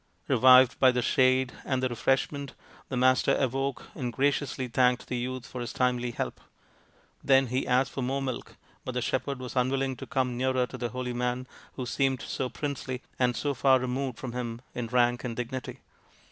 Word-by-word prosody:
Revived 130 +1 +6
by 130 -1 +6
the, 125 -1 0
shade 130 -1 +3
and 130 -1 -1
the - - +3
refreshment, 135 +3 -1 0.3
the 130 - -2
Master 130 +1 +4
awoke 135 0 -2
and 125 -2 -3
graciously 135 0 0
thanked 125 +1 +2
the 125 - -4
youth 125 0 -4
for 125 - -7
his 120 - -4
timely 125 -1 +1
help. 120 - -4 0.8
Then 135 -1 +5
he 130 +2 -1
asked 130 +1 +2
for 135 - -4
more 130 +2 -1
milk, 130 -3 -5 0.3
but - - -5
the - - -1
shepherd 140 -1 -1
was 130 0 -7
unwilling 130 +1 +1
to - - -8
come 130 -4 0
nearer 130 0 +1
to - - -9
the 120 - -2
holy 125 0 -4
man 125 +1 -1 0.3
who 130 - -5
seemed 130 -1 0
so 130 - -3
princely, 130 -3 -4 0.2
and 125 -1 +2
so 145 +4 -1
far 135 +1 +4
removed 130 0 -2
from 130 - -5
him 120 -1 -4
in 120 -1 -3
rank 120 0 +2
and 120 -2 -4
dignity. 125 +2 -5
130 Hz, 190 wpm, -28 LUFS, 125-130 Hz, 0.8 s, Revived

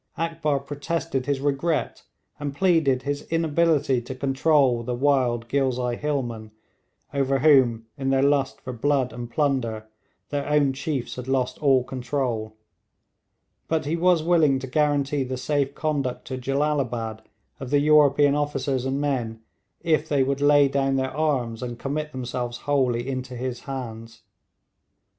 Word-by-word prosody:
Akbar 165 -3 -1
protested 145 -1 -3
his 140 -2 0
regret, 145 +3 -1 0.4
and 145 -1 -4
pleaded 160 -8 +2
his 145 +1 -2
inability 160 -5 +2
to 125 +2 -7
control 135 -2 +2
the 120 +1 -3
wild 125 -3 +1
Ghilzai 125 -2 0
hillmen, 120 -7 -3 0.6
over 135 -1 +1
whom, 130 -6 +4
in 135 -1 -1
their 135 0 +3
lust 140 -1 +1
for 130 - -6
blood 130 0 0
and 120 0 -6
plunder, 120 -6 -1 0.4
their 145 0 -3
own 145 -2 +3
chiefs 135 -2 -4
had 125 0 -6
lost 130 -1 -1
all 135 -4 +4
control; 125 -4 -3 1.1
but 160 -1 0
he 155 +3 0
was 175 -1 +3
willing 160 -5 +3
to 130 - -5
guarantee 145 0 +1
the 130 0 -4
safe 140 +1 -1
conduct 140 -5 -2
to 130 - -5
Jellalabad 130 -5 -1 0.4
of 135 - -6
the 145 - +3
European 145 -1 +5
officers 140 -3 -1
and 135 +1 -1
men 120 -6 -2 0.4
if 160 -2 +1
they 140 -3 +3
would 140 +1 -1
lay 145 -1 +5
down 135 0 0
their 130 0 -1
arms 130 -8 -1
and 120 -2 -5
commit 150 +4 -3
themselves 125 -2 -4
wholly 130 -4 +1
into 130 -1 -4
his 125 0 -4
hands. 115 -3 -7
135 Hz, 145 wpm, -24 LUFS, 125-145 Hz, 1.1 s, European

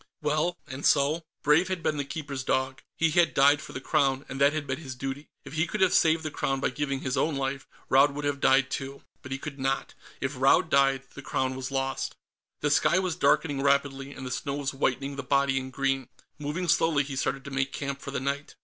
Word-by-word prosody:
Well, 155 +3 0
and 135 +2 -8
so? 145 +4 +3 0.2
Brave 155 +5 +4
had 185 -3 -3
been 150 - 0
the 145 - -1
Keeper's 140 -2 -5
dog. 130 +1 -1 0.2
He 165 -1 +2
had 170 +2 +3
died 140 +1 +5
for - - -10
the - - -5
Crown, 135 -1 +1
and 135 +1 -6
that 140 +1 +6
had 155 -1 -3
been 130 +1 -3
his 135 -5 -7
duty. 135 +3 -5 0.2
If 140 - -9
he 160 +2 +1
could 210 - -4
have 190 -1 +4
saved 160 0 +4
the 155 - -3
Crown 135 -1 -1
by 135 - 0
giving 140 0 -2
his 130 +1 -2
own 150 +3 +1
life, 135 0 -3 0.2
Raud 140 +2 +4
would 145 0 -4
have 145 -1 -1
died 135 -1 +4
too. 135 +1 -5 0.2
But 130 - -10
he 135 - -1
could 140 0 -7
not 135 +1 -1 0.3
if 135 +1 -2
Raud 135 +4 +3
died 135 -1 +3
the 140 - -9
Crown 130 -1 -1
was 130 0 -4
lost. 135 -1 -2 0.5
The 150 - +1
sky 170 - +4
was 185 -3 0
darkening 145 -2 +2
rapidly, 140 -1 +1
and 135 - -8
the 125 - -5
snow 140 +2 -3
was 140 -2 -2
whitening 135 +1 -1
the - - -2
body 140 +1 +2
in 130 0 -6
green. 135 -1 -1 0.3
Moving 150 +5 -3
slowly, 155 -2 +3
he 140 0 -6
started 135 0 -1
to 140 - -7
make 135 0 -1
camp 140 -1 -4
for - - -7
the 140 - -2
night. 140 +2 -3
140 Hz, 235 wpm, -27 LUFS, 135-150 Hz, 0.5 s, that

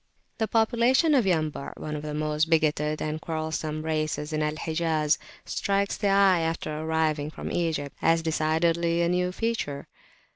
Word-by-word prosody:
The 220 - +1
population 235 - +3
of 255 -6 +4
Yambu' 155 -5 -1
one 150 0 -5
of 150 - -4
the 150 0 -5
most 155 +1 0
bigoted 155 -1 +1
and 155 +1 -3
quarrelsome 155 -1 -3
races 155 -1 -2
in 155 - 0
Al 150 0 0
Hijaz 155 -1 0 0.3
strikes 200 0 0
the 205 - -1
eye 195 -2 +5
after 165 -2 -2
arriving 155 -1 0
from - - -6
Egypt, 155 -5 -2
as 165 0 +3
decidedly 165 +2 +1
a 170 - +2
new 180 0 +1
feature. 185 -10 -3
160 Hz, 155 wpm, -26 LUFS, 155-175 Hz, 0.3 s, eye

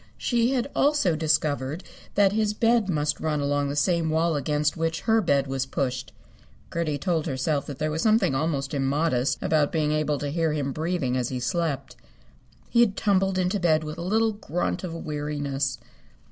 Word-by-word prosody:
She 240 +1 +1
had 250 +1 0
also 285 - +3
discovered 150 0 0 0.3
that 200 -1 +5
his 210 -1 +1
bed 230 -2 +2
must 150 -3 0
run 155 -2 -1
along 145 0 0
the 140 - -3
same 165 +2 +1
wall 160 +1 +1
against 150 +1 0
which 165 0 -1
her 225 0 +3
bed 140 -7 +2
was 135 0 -2
pushed. 125 -2 -2 0.6
Gertie 160 -3 -1
told 165 0 -1
herself 140 +2 -1
that 145 - -6
there 155 0 -1
was 160 +1 -2
something 215 -8 +3
almost 140 -1 -1
immodest 140 -1 +1
about 155 -2 +2
being 155 -2 +1
able 150 -1 0
to 145 +1 -3
hear 165 0 0
him 140 -2 -1
breathing 155 -4 -1
as 125 -2 -1
he 130 - -3
slept. 155 +2 -2 0.7
He 235 - +1
had 210 -4 +4
tumbled 195 -2 +2
into 185 +2 0
bed 160 -3 +2
with 155 +2 -6
a - - -4
little 220 +5 +2
grunt 180 -4 -3
of 170 -3 -4
weariness. 145 -3 -2
155 Hz, 180 wpm, -25 LUFS, 145-180 Hz, 0.7 s, that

